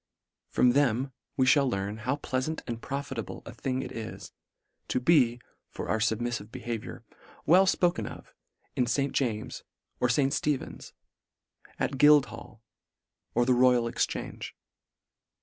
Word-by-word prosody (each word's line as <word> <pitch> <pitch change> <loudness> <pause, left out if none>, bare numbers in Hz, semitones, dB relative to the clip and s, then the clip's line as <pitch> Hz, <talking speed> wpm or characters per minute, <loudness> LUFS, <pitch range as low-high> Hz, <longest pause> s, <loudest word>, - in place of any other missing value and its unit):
From 125 - +4
them 135 -1 +2 0.3
we 130 - +4
mail 140 -2 +3
learn, 100 -1 -3
how 130 +5 -1
pleafant 145 +2 -3
and 115 -2 -5
profitable 135 -6 -5
a - - -8
thing 130 0 -2
it 130 - -7
is, 115 -1 -7 0.6
to - - 0
be, 125 -4 +4 0.3
for - - -6
our 110 - +1
fubmiiTive 115 -1 -1
behaviour, 120 -3 -6 0.4
well 185 +4 +6
fpoken 175 -1 +1
of - - -11 0.4
in 125 - +1
St. 140 +3 0
James's, 110 -5 -2 0.4
or 125 - +2
St. 135 +2 +2
Stephen's; 145 -3 -2 0.8
at 135 -2 -2
Guildhall, 145 -6 +3 0.7
or 120 - +3
the 130 - +4
Royal 125 -1 +4
Exchange. 115 - -3
125 Hz, 130 wpm, -28 LUFS, 115-140 Hz, 0.8 s, well